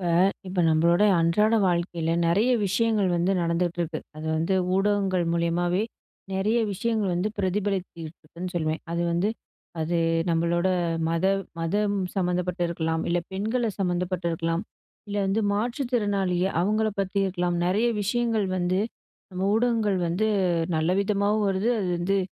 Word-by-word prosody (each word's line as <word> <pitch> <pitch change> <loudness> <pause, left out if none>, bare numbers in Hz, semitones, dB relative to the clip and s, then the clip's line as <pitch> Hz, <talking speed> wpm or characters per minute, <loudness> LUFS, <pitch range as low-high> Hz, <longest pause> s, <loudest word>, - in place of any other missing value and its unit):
இப்ப 175 -2 -1 0.4
இப்ப 185 -1 -1
நம்மளோடைய 170 +6 +4
அன்றாட 210 +7 +3
வாழ்க்கையில, 170 -2 0 0.2
நிறைய 205 +9 +3 0.2
விஷயங்கள் 210 0 +1
வந்து 175 +3 +1
நடந்துட்ருக்கு. 170 -1 -1 0.2
அது 155 +1 -6
வந்து 165 +4 0 0.2
ஊடகங்கள் 195 -2 +1
மூலியமாவே, 175 +2 +1 0.5
நிறைய 210 +5 +1
விஷயங்கள் 215 0 -1
வந்து 180 +4 0
பிரதிபலிச்சுக்கிட்டிருக்குன்னு 185 -3 -3
சொல்லுவேன். 160 -2 -1
அது 170 0 0
வந்து 175 +5 +1 0.5
"அது 165 +2 0 0.3
நம்மளோட, 170 +2 +1 0.4
மத 165 +2 -1 0.4
மதம் 205 +5 0 0.2
சம்மந்தப்பட்டிருக்கலாம். 175 -3 -1
இல்ல, 175 - +2
பெண்கள 220 +4 -1
சம்மந்தப்பட்டிருக்கலாம். 175 -2 -1 0.5
இல்ல 205 - -3
வந்து, 195 +3 +1
மாற்று 235 +7 -1
திறனாளிய, 195 -6 +1 0.2
அவங்கள 215 +4 +1
பத்தி 195 0 -2
இருக்கலாம்". 175 -2 -1
நிறைய 210 +6 +2
விஷயங்கள் 225 0 0
வந்து, 180 +1 +1 0.5
நம்ம 185 +1 -2
ஊடகங்கள் 225 -4 +1
வந்து 185 +6 0 0.5
நல்ல 160 +2 +1
விதமாவும் 205 +1 +1
வருது. 195 +4 +1
அது 190 - -1
வந்து, 195 +3 +1
185 Hz, 125 wpm, -25 LUFS, 170-205 Hz, 0.5 s, நம்மளோடைய